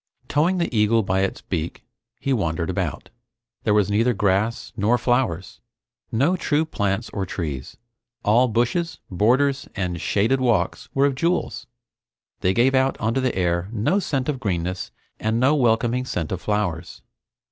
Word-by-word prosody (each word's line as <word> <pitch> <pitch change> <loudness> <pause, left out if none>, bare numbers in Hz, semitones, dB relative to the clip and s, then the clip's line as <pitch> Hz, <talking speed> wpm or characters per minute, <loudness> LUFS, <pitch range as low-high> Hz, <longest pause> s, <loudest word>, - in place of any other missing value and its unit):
Towing 165 +6 +2
the 170 -8 -1
eagle 110 +1 +3
by 95 0 0
its 95 0 -1
beak, 85 -2 -4 0.4
he 135 - 0
wandered 85 -5 -1
about. 90 -5 -3 0.5
There 105 - +3
was 105 -1 +2
neither 115 +3 +2
grass 100 +3 0
nor 110 +4 +2
flowers; 120 -8 -1 0.5
no 140 +11 +2
true 160 -3 +1
plants 105 -6 -2
or 100 - -2
trees. 75 -8 -5 0.5
All 120 +5 +5
bushes, 120 +9 0
borders, 130 +9 +2
and 90 -4 -2
shaded 115 +6 +1
walks 120 -4 0
were 135 +1 +4
of 140 - +2
jewels. 170 +7 -1 0.7
They 95 -1 +1
gave 130 +3 +4
out 130 0 +2
onto 115 +4 0
the 130 - 0
air 85 0 0
no 115 - +1
scent 135 -8 -2
of 145 -4 -1
greenness 90 -4 -2 0.3
and 110 +1 0
no 130 +4 +4
welcoming 120 -2 +2
scent 85 -10 -3
of 95 - -3
flowers. 100 -6 -2
110 Hz, 155 wpm, -23 LUFS, 95-130 Hz, 0.7 s, All